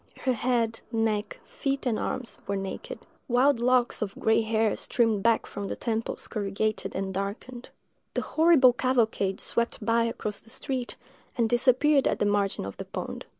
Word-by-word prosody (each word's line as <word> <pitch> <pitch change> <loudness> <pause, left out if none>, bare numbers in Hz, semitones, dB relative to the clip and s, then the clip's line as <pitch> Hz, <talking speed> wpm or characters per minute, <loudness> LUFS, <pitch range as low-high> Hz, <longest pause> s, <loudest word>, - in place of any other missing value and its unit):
Her 260 - +1
head, 230 -1 0
neck, 225 - -1
feet, 275 - -3
and 235 -4 +1
arms, 250 -3 -3
were 200 - -1
naked; 195 -1 -5 0.3
wild 255 +1 +3
locks 245 0 +2
of 200 -2 -3
gray 220 +1 +3
hair 220 0 +1
streamed 225 -4 +1
back 230 +1 +3
from 200 -1 -6
temples 225 -1 -3
corrugated 210 +1 -2
and 190 0 -2
darkened. 210 +6 -5 0.5
The - - 0
horrible 315 -6 +5
cavalcade 230 -6 +1
swept 235 0 -2
by 230 0 +3
across 215 -3 -3
the 225 - -19
street, 255 +1 -4 0.4
and 230 -2 +3
disappeared 260 +4 +4
at - - +1
the - - +1
margin 205 - 0
of 100 - -7
the - - -6
pond." - - -6
230 Hz, 160 wpm, -27 LUFS, 210-255 Hz, 0.5 s, horrible